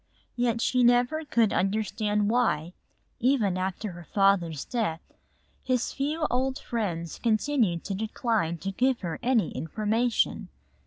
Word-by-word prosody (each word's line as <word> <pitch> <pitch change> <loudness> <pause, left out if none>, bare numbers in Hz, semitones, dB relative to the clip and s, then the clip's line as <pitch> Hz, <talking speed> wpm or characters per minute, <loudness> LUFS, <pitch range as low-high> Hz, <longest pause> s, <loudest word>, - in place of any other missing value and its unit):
Yet 240 -2 0
she 250 0 +2
never 245 +6 +3
could 235 -7 +2
understand 210 +1 0
why, 180 -9 +1 0.5
even 235 -7 +2
after 190 +2 -3
her 175 0 -10
father's 180 -5 +1
death, 215 -10 -1 0.6
his 255 -2 -1
few 300 +3 -1
old 260 +2 0
friends 175 -8 -3
continued 220 - +1
to 195 - -4
decline 215 -4 -1
to 195 - -2
give 255 +5 +1
her 170 -4 -4
any 240 -3 +2
information. 220 +7 0
220 Hz, 125 wpm, -27 LUFS, 190-245 Hz, 0.6 s, never